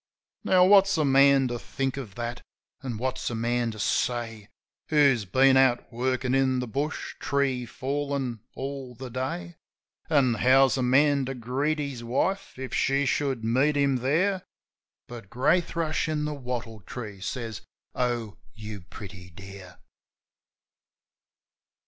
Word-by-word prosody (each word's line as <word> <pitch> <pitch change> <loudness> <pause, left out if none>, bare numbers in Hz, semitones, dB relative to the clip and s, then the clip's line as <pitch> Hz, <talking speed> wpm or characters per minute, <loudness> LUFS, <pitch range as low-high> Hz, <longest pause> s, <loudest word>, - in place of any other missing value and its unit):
Now 180 -1 +5
what's 195 -1 +5
a 155 - +2
man 135 0 +5
to 120 0 -3
think 135 +2 -3
of 120 -8 -7
that, 120 0 -4 0.4
an' 125 -5 -4
what's 130 +2 -2
a 120 - -4
man 120 +1 0
to 110 - -7
say. 115 -1 -1 0.4
Who's 140 -8 +3
been 130 +7 +4
out 130 -2 +3
workin' 130 +1 -1
in 135 -1 +2
the 125 - -1
bush, 140 +7 -3
tree 135 -3 0
fallin', 135 -2 -3 0.2
all 135 -2 -6
the 130 +1 -8
day? 115 -9 -4 0.5
An' 140 -6 +3
how's 130 +1 +5
a 130 - -1
man 140 +2 +3
to 135 +1 -4
greet 130 +6 -1
his 140 -5 -4
wife, 170 +12 -1
if 130 0 -6
she 140 -1 +2
should 135 -4 0
meet 130 +6 +2
him 140 -2 +2
here? 185 +9 +1 0.7
But 115 -5 -10
Grey 135 - +3
Thrush 165 -2 -2
in 150 -1 -1
the 150 - -2
wattle 125 -5 -5
tree 105 -2 -8
says, 115 0 -5 0.3
"Oh, 120 -4 -2 0.2
you 105 -2 -8
pretty 90 -1 -11
dear!" 95 0 -12
130 Hz, 145 wpm, -26 LUFS, 115-140 Hz, 0.7 s, Now